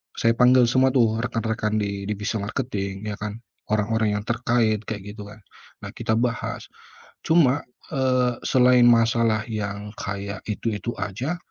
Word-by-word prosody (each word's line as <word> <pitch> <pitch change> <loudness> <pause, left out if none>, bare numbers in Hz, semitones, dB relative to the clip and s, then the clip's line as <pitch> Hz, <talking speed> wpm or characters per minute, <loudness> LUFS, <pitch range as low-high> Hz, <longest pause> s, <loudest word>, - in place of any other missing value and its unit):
saya 115 - +2
panggil 125 0 +6
semua 130 0 +4
tuh 115 -3 +3
rekan-rekan 110 -2 -1
di 100 -1 -3
divisi 105 +2 -2
marketing 100 -3 -4
ya 105 - -3
kan, 105 +1 -5 0.3
orang-orang 110 0 +1
yang 105 - -8
terkait 115 -3 +1
kayak 105 -3 -4 0.2
gitu 105 - -7
kan, 105 +1 -12 0.4
nah - - -6
kita 110 - -2
bahas. 115 -1 -2 0.6
Cuma, 145 -4 +4 0.3
eee, 130 -3 +2
selain 125 -1 +5
masalah 115 -2 +3
yang 105 -1 -4
kayak 100 0 -5
itu-itu 105 +1 -3
aja, 110 - -3
115 Hz, 140 wpm, -24 LUFS, 105-125 Hz, 0.6 s, panggil